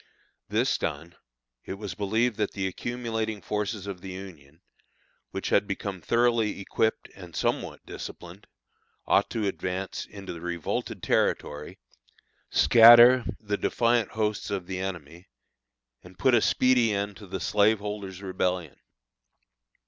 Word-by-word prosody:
This - - +1
done, 85 +4 -4 0.5
it 95 - -6
was 100 -2 -6
believed 110 +4 0
that 105 -2 -1
the 100 -1 -2
accumulating 110 +1 -3
forces 105 0 -3
of 95 -3 -6
the 95 - -8
Union, 85 -5 -11 0.7
which - - -4
had - - +3
become 95 -3 -4
thoroughly 115 0 +1
equipped 110 +3 -1
and 90 -3 -12
somewhat - - -2
disciplined, 90 +3 -9 0.6
ought - - +3
to 110 -2 -2
advance 95 -1 -3
into 100 -3 -8
the 85 - -9
revolted 85 -2 -4
territory, 75 +1 -1 0.7
scatter 120 +1 +8
the 105 -1 -2
defiant 115 -2 +1
hosts 110 -1 -1
of 100 -3 -3
the 95 0 -5
enemy, 85 -2 -6 0.7
and 90 0 -16
put 125 +7 +3
a 120 - +5
speedy 125 -2 +3
end 100 0 -2
to 105 - -12
the 95 +1 -4
slaveholders' 105 -1 0
Rebellion. 90 -4 -2
100 Hz, 130 wpm, -27 LUFS, 90-110 Hz, 0.7 s, scatter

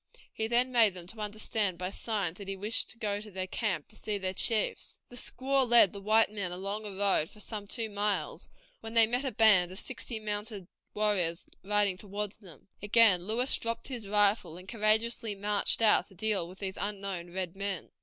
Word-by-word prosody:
He 220 - -2
then 245 +2 +2
made 225 -6 +4
them 175 -1 -9
understand 210 -2 -1
by 180 +1 -4
signs 200 -6 -3
that 200 - -8
he 195 - -3
wished 210 +4 0
to - - -6
go 205 -3 -2
to 215 - -8
their 185 -1 -4
camp 185 -5 -2
to 220 - -15
see 210 -1 -3
their 185 -1 -3
chiefs. 215 +3 +1
The 245 - -12
squaw 265 +1 0
led 235 -5 +7
the 200 - -7
white 215 +2 +3
men 200 -4 -3
along 200 +4 -4
a - - -6
road 195 -5 +2
for 210 - -16
some 210 -1 -6
two 225 +2 -2
miles, 200 -6 -2 0.3
when 225 +1 -8
they 230 -1 +7
met 245 +4 -1
a 265 - -1
band 210 -7 +5
of 185 - -6
sixty 240 -1 -5
mounted 210 -2 -4 0.3
warriors 190 -6 0 0.2
riding 205 -2 +1
toward 205 +1 -4
them. 190 -6 -16
Again 205 -4 +5
Lewis 245 +5 +2
dropped 230 +2 -4
his 240 -6 -5
rifle, 200 -4 +2
and 185 +1 -13
courageously 220 +1 +1
marched 205 +2 +1
out 215 - +4
to 195 - -17
deal 200 -3 -1
with 185 - -12
these 190 -1 -5
unknown 195 -4 -4
red 180 -1 -4
men. 195 -4 -4
205 Hz, 200 wpm, -30 LUFS, 190-220 Hz, 0.3 s, led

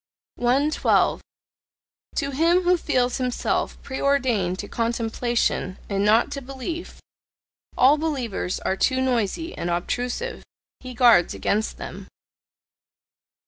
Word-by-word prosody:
112. 270 +6 +2 0.9
To 280 -2 -1
him 335 +6 +3
who 360 +1 +4
feels 250 -7 0
himself 250 -2 -1
preordained 260 -9 0
to 205 - -6
contemplation 230 -4 -1
and 200 -1 0
not 215 +3 +4
to 275 - -4
belief, 275 +6 -6 0.8
all 280 +4 +5
believers 250 - -2
are 190 - 0
too 260 +6 +1
noisy 260 - -1
and 175 - -3
obtrusive; 245 - -2 0.4
he 255 -1 -9
guards 235 -8 +5
against 215 +2 -1
them. - - -8
250 Hz, 105 wpm, -24 LUFS, 220-280 Hz, 0.9 s, all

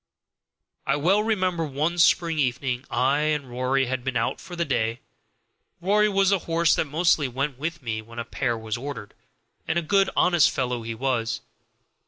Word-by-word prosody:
I - - +3
well 180 +8 +3
remember 185 -6 0
one 155 +4 -1
spring 165 -1 +3
evening 130 -1 -1
I 130 +4 +2
and 150 -2 0
Rory 130 +2 +1
had 130 0 -3
been 130 -1 -1
out - - -1
for 175 - -9
the 170 0 -1
day. 115 -4 -1 0.8
(Rory 210 +4 +3
was 195 -1 +2
the 195 - +3
horse 165 0 +3
that - - +1
mostly 155 -1 +2
went 135 +1 -3
with 160 0 -4
me 110 -2 -3
when 115 +2 -14
a 120 - -3
pair 120 0 -2
was 110 -1 -4
ordered, 130 -5 -7 0.5
and 160 - 0
a 170 - 0
good 195 +4 +3
honest 175 -4 +4
fellow 125 -2 -2
he 115 0 -5
was.) 120 -2 -1
140 Hz, 180 wpm, -25 LUFS, 125-170 Hz, 0.8 s, honest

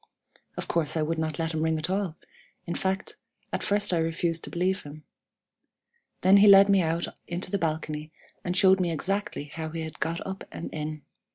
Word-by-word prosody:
Of - - -4
course 165 -1 +1
I 155 - +2
would 160 +1 -1
not 155 -2 -2
let 165 0 -2
him 155 - -1
ring 160 0 +1
at 155 - -3
all; 190 -3 -1 0.5
in 170 - -3
fact, 190 +2 -2 0.4
at - - -1
first 205 -2 +1
I 170 - +2
refused 165 0 -1
to - - -7
believe 185 +2 0
him. 150 +1 -11 1.2
Then 190 +2 +7
he 205 +1 +7
led 200 0 +9
me 195 -1 +5
out 165 0 0 0.2
into 175 +1 -2
the 200 - 0
balcony, 155 -1 -2 0.3
and 180 +1 -1
showed 190 0 +6
me 180 -2 +1
exactly 195 +1 -2
how 160 +2 -6
he 165 +1 -5
had 160 -1 -7
got 165 +1 -2
up 190 0 -5
and - - -7
in. 155 -1 -4
165 Hz, 200 wpm, -27 LUFS, 160-190 Hz, 1.2 s, led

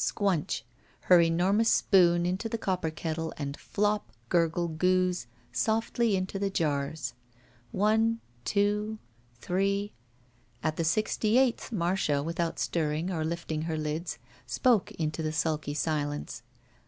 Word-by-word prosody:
Squnch! 185 - 0 0.4
Her 180 -2 +6
enormous 185 +7 +3
spoon 175 -3 +4
into 185 +5 -1
the 230 - -2
copper 185 -6 -1
kettle 160 0 -3
and 140 -1 -4
flop, 210 - -1 0.2
gurgle, 170 0 +2
gooze, 180 -1 +1 0.2
softly 225 0 +1
into 190 +1 -2
the 200 0 0
jars. 145 -6 -1 0.6
One 220 +3 +2
— 120 0 -33
two 210 +1 +1 0.2
— 120 0 -33
^three 200 +2 0 0.4
— 120 0 -35
At 155 0 0
the 165 - +1
sixty 215 +5 +1
eighth, 260 -3 +2
Marcia, 170 -7 +1
without 165 +1 -2
stirring 160 +2 -1
or 160 -3 -1
lifting 160 -1 -3
her 160 - -1
lids, 155 +3 -3 0.3
spoke 240 -7 +2
into 155 -1 -2
the 155 - -1
sud^ 155 -2 -1
silence. 145 -2 -2
170 Hz, 135 wpm, -29 LUFS, 155-200 Hz, 0.6 s, Her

